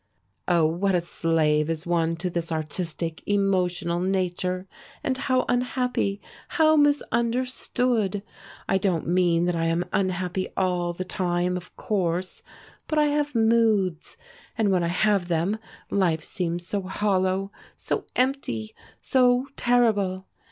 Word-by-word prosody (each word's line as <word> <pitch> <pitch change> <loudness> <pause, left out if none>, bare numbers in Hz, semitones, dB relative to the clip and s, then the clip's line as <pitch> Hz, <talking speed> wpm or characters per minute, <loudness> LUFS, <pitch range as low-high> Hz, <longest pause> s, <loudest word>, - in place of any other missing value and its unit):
Oh, 170 -3 +4
what 180 +5 +1
a - - +4
slave 160 -3 +1
is 165 +1 -3
one 165 -1 +1
to 175 +2 -3
this 170 -1 -3
artistic, 160 +1 -3
emotional 180 -4 +1
nature, 185 0 -1 0.4
and 260 - 0
how 255 -1 +1
unhappy, 245 -5 0 0.3
how 315 -2 +4
misunderstood! 245 -6 +1 0.4
I 190 - +2
don't 180 -4 0
mean 175 -1 +2
that 175 -1 0
I 165 0 0
am 165 +2 0
unhappy 185 -1 -1
all 180 -2 +1
the 185 +2 -5
time, 180 -1 -1
of 180 0 -8
course, 185 -3 -2 0.5
but 310 - -1
I 300 -1 +4
have 290 -1 -1
Moods. 220 -6 +2 0.4
And 215 -3 +2
when 180 -2 +2
I - - +1
have 195 +1 +1
them 175 +5 0 0.3
life 175 -5 +1
seems 175 -3 -3
so 200 +2 -2
hollow, 190 0 0 0.2
so - - -3
empty, 250 - -1 0.3
so 250 +1 +3
terrible! 205 -6 +2
185 Hz, 130 wpm, -25 LUFS, 175-220 Hz, 0.5 s, Oh